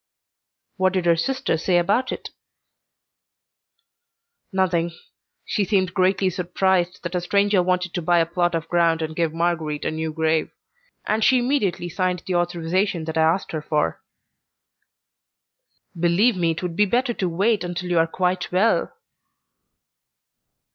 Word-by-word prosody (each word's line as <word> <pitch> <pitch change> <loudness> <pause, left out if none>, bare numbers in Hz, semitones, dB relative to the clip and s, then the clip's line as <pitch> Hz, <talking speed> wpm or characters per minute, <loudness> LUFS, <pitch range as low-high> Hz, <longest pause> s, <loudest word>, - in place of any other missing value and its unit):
"What 185 0 +2
did 185 -2 -1
her 170 -1 +4
sister 260 +1 -1
say 175 +1 +2
about 205 +9 +1
it?" - - -6 2.2
"Nothing. 175 -3 0 0.5
She 210 - 0
seemed 190 -3 +1
greatly 185 0 +2
surprised 180 0 0
that 170 0 -5
a 180 - 0
stranger 200 +1 +2
wanted 180 0 -1
to 175 - -2
buy 175 +1 +2
a 165 - +3
plot 175 0 0
of 165 0 -3
ground 165 -2 +2
and 155 0 -5
give 165 -2 0
Marguerite 165 -3 -2
a - - 0
new 160 0 -3
grave, 160 0 0 0.6
and 215 +1 0
she 260 - +5
immediately 240 -9 0
signed 180 0 -2
the 185 - -3
authorization 175 +1 0
that 160 0 -5
I 160 - +2
asked 165 +4 +1
her 155 - -3
for." 150 0 -1 1.9
"Believe 175 +7 +3
me, 170 -2 +1
it 165 +2 -3
would 175 -2 -3
be 205 +2 +3
better 245 +4 +1
to 185 -5 -2
wait 200 +5 +1
until 180 0 -4
you 170 - +3
are 165 - +3
quite 180 +1 -1
well." 200 +5 +2
175 Hz, 150 wpm, -22 LUFS, 165-190 Hz, 2.2 s, she